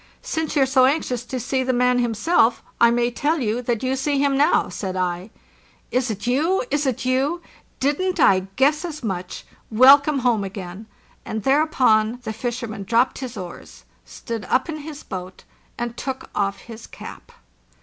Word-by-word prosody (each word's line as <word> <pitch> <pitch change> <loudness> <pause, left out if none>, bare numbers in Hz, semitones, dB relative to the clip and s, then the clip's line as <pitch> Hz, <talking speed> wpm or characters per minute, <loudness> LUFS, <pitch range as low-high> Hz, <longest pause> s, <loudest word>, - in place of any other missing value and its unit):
| - - -31
"Since 320 -1 -3
you're 275 -2 +4
so 260 -1 +4
anxious 255 -4 0
to 255 +1 -4
see 260 +2 -1
the 260 0 0
man 250 0 +3
himself, 235 +1 +2 0.2
I 235 - +6
may 240 +1 +1
tell 300 +6 0
you 230 -1 -1
that 240 -1 -2
you 260 +1 0
see 280 +2 0
him 280 0 +2
now," 285 +2 +3
said 190 -2 -5
I. 180 +1 -2 0.6
"Is 255 0 0
it 210 0 -4
you? 300 +10 +1
Is 290 0 +1
it 250 -1 -2
you? 275 +7 0 0.4
Didn't 345 +7 0
I 190 -7 +4
guess 295 +4 +3
as 310 -6 -6
much! 185 -4 -4 0.2
Welcome 275 +6 +6
home 240 -5 +1
again!" 195 +1 -7 0.4
And 220 -1 -5
thereupon 255 -6 +3
the 220 -2 -4
fisherman 230 -2 -4
dropped 230 +5 +1
his 255 -4 -6
oars, 180 -3 -9 0.2
stood 230 -3 -6
up 255 0 +1
in 315 - -3
his 300 0 -9
boat, 185 0 -8 0.3
and 240 -1 -4
took 265 +1 -6
off 200 -1 -1
his 225 -1 -11
cap. - - -11
250 Hz, 175 wpm, -22 LUFS, 220-280 Hz, 0.6 s, I